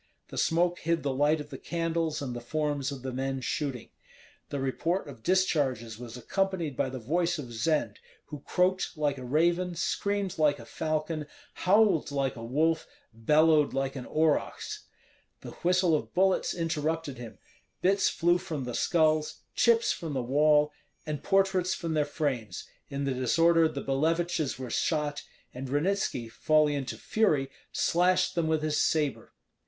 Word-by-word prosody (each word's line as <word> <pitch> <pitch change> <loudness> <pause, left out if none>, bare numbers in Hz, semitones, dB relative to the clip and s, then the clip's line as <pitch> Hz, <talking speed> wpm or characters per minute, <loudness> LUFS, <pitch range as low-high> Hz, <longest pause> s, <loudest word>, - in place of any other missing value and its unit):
The - - -8
smoke 175 +1 +2
hid 165 0 0
the 140 -2 0
light 145 +3 +2
of 150 0 -8
the 135 - -7
candles 165 -3 -2
and 125 -3 -4
the 120 - -5
forms 145 +1 -2
of 135 -2 -7
the 130 -1 -4
men 135 +1 -2
shooting. 130 -1 -3 0.6
The 140 - -3
report 165 +8 -1
of 130 -5 -11
discharges 135 - 0
was 120 0 -8
accompanied 175 - -1
by 130 - 0
the 130 - -6
voice 170 +9 0
of 125 -6 -7
Zend, 150 +7 0 0.3
who 150 - -8
croaked 185 +3 0
like 145 -3 0
a - - -7
raven, 170 +6 +1
screamed 200 +2 -1
like 150 -2 +3
a 115 - -11
falcon, 155 +2 -2 0.3
howled 195 -4 +3
like 135 -2 -1
a 115 - -8
wolf, 155 +7 +1 0.3
bellowed 150 +6 +3
like 135 0 -1
an 130 -2 -6
aurochs. 155 -1 0 0.6
The - - -8
whistle 180 -1 +3
of 155 - -2
bullets 190 +1 +2
interrupted 160 -4 -2
him; 120 -2 -9 0.5
bits 195 +2 +3
flew 175 +1 +2
from 155 -6 -4
the 125 -1 -5
skulls, 155 -1 +1
chips 235 -1 +3
from 160 -3 -4
the 130 -2 -1
wall, 150 +3 +3 0.3
and 150 -2 -4
portraits 190 -2 +2
from 165 -2 -3
their 150 -1 +2
frames; 140 -7 -3 0.2
in 140 0 -3
the 135 -1 0
disorder 165 +6 +4
the 140 -3 -5
Billeviches 160 +1 0
were 130 -2 -6
shot, 150 -2 0 0.3
and 130 +1 -6
Ranitski, 145 -4 0
falling 155 +5 +2
into 135 -3 -3
fury, 150 -12 +1 0.2
slashed 180 +1 +2
them 170 -2 0
with 160 -1 +1
his 155 -1 +1
sabre. 150 -4 0
155 Hz, 160 wpm, -29 LUFS, 135-170 Hz, 0.6 s, disorder